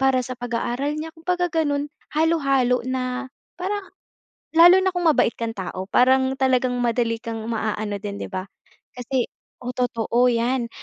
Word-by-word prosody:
para 265 -1 +3
sa 255 - -5
pag-aaral 245 +4 -2
niya 320 +1 -5
kumbaga 355 +1 -1
gano'n, 290 -3 +1 0.3
halo-halo 275 -6 +2
na 255 0 -2 0.3
parang 395 +2 -3 0.7
lalo 350 +3 +8
na 375 0 +1
kung 355 - -1
mabait 285 -7 +3
kang 230 -1 -4
tao 185 0 -5
parang 260 +1 +3
talagang 255 -1 +2
madali 235 -1 +1
kang 225 -1 -5
maaano 215 -2 -2
din, 200 0 -5
di - - -3
ba? 185 0 -4 0.5
Kasi 250 0 -1 0.4
o 250 - -3
totoo 245 0 +1
yan. 240 +1 0
255 Hz, 150 wpm, -23 LUFS, 235-295 Hz, 0.7 s, lalo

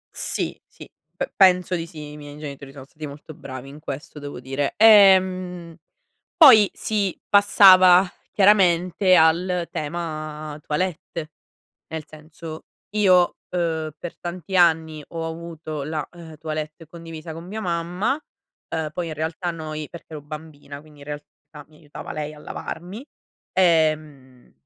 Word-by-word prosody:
Sì, - - -3
sì - - -14 0.3
p - - -4
penso 180 -2 +4
di 165 -1 -4
sì. 150 -2 -9
I 150 - -10
miei 145 0 -10
genitori 140 -2 -8
sono 135 -1 -11
stati 150 +2 -9
molto 145 +2 -11
bravi 130 -2 -9
in 145 +2 -12
questo 150 0 -7
devo 145 -3 -7
dire. 135 +2 -2
Ehm, 185 -5 +5 0.6
poi 230 - +8
si 205 -4 -1
passava 190 -3 +7 0.3
chiaramente 185 -2 +4
al 170 +2 +2
tema 155 -1 -5
toilette. 160 -1 -3 0.6
Nel 160 -2 -6
senso, 155 +1 -10 0.3
io, 185 -4 +4
uhm, 160 -3 -2
per 175 - -8
tanti 175 +1 -6
anni 160 -3 +3
ho 165 -1 -4
avuto 160 -2 -6
la, 155 +1 -4
uhm, 165 -2 -12
toilette 155 +1 -6
condivisa 165 -1 -9
con 165 +2 -9
mia 215 +4 -6
mamma, 180 - -1 0.5
uhm, 160 -2 -2
poi 170 +2 -4
in - - -4
realtà 160 +3 -3
noi 155 -2 -6
perché 165 -1 -12
ero 150 - -7
bambina, 150 -2 -10
quindi 150 -1 -18
in 140 - -12
realtà 145 0 -7 0.4
mi 155 - -21
aiutava 150 -2 -9
lei 150 0 -5
a 150 - -14
lavarmi. 185 - -7 0.5
Ehm, 155 -7 0
160 Hz, 140 wpm, -23 LUFS, 150-180 Hz, 0.6 s, poi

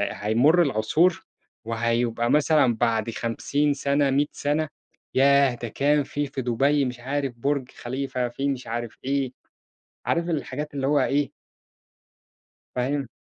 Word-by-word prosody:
هيمُر 125 +12 +3
العصور، 150 +7 +2 0.4
وهيبقى 115 +1 0
مثلًا 150 -5 +4
بعد 115 -1 0
50 140 +6 0
سنة 140 0 +1
100 145 +2 +2
سنة 150 +2 -1 0.5
ياه 140 -1 +5
ده 120 0 -6
كان 145 +6 +2
في 145 +1 -3
في 135 -1 -5
دُبَي 135 +4 +2
مش 125 -1 -5
عارف 135 +1 -2
بُرج 135 +1 -1
خليفة، 130 0 -3
فيه 135 +4 -3
مش 130 -2 -4
عارف 120 0 -5
إيه، 135 -1 -1 0.7
عارف 170 +1 0
الحاجات 145 -1 -3
اللي 135 -1 -1
هو 145 +1 +3
إيه 140 +1 +1 1.5
فاهم؟ 135 +2 -1
135 Hz, 130 wpm, -25 LUFS, 120-145 Hz, 1.5 s, ياه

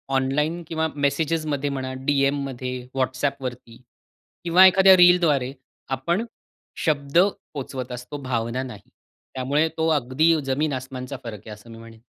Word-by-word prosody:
Online 150 +6 0
किंवा 160 0 -1
मेसेजेसमध्ये 145 0 -1
म्हणा, 130 -1 -4
डीएममध्ये, 135 -2 -1
WhatsAppवरती 130 -2 -3 0.6
किंवा 175 +2 +6
एखाद्या 190 0 +7
रीलद्वारे 170 -7 +4 0.4
आपण 170 - -1 0.6
शब्द 145 -1 0
पोहोचवत 135 - -2
असतो, 125 +4 -7
भावना 125 -2 -2
नाही. 105 -6 -10 0.4
त्यामुळे 140 +5 +1
तो 160 0 +1
अगदी 145 +5 +2
जमीन-आसमानचा 135 -1 -3
फरक 110 -3 -7
आहे, 110 - -9
असं 105 +2 -15
मी 115 - -11
म्हणेन. 115 0 -13
135 Hz, 120 wpm, -23 LUFS, 130-155 Hz, 0.6 s, एखाद्या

